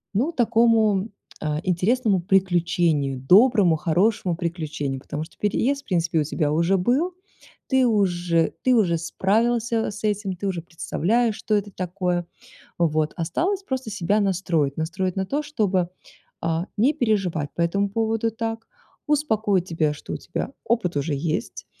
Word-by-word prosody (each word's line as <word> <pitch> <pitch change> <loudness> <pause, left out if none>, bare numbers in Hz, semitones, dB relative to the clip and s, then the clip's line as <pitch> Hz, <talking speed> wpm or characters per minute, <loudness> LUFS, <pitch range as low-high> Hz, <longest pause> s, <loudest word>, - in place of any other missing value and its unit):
ну, 265 +11 +1
такому, 225 - +3 0.3
а, 150 -1 -2
интересному 190 +3 +1
приключению, 175 -7 +1
доброму, 195 - +5
хорошему 175 +3 +1
приключению. 155 -6 -3
Потому 150 +2 -5
что - - -21
переезд 275 +7 0
в - - -46
принципе 170 -3 0
у - - +2
тебя 150 0 -1
уже 170 +5 +2
был, 265 - +1 0.5
ты 265 -1 +3
уже, 175 -6 +1
ты 255 - +4
уже 180 -8 +3
справился 225 +6 0
с 205 - -10
этим, 205 -3 -1
ты 200 +3 -4
уже 175 -4 -3
представляешь, 210 +7 0
что 215 - -3
это 205 -1 0
такое. 180 -1 -2 0.5
Вот, 155 -2 +1
осталось 340 - -1
просто 260 - -4
себя 205 +1 +1
настроить, 175 -8 0
настроить 180 +3 -2
на 190 -1 -2
то, 290 +6 -1
чтобы, 200 - 0 0.5
а, 165 +1 -1
не 250 +8 +3
переживать 195 - 0
по 170 - -3
этому 200 +4 +1
поводу 225 +1 0
так, 225 0 -4 0.4
успокоить 220 - +1
тебя, 160 -3 0
что 145 - -8
у - - -3
тебя 210 +8 -5
опыт 225 -9 0
уже 145 +2 -1
есть, 155 - -3
190 Hz, 150 wpm, -23 LUFS, 170-225 Hz, 0.5 s, доброму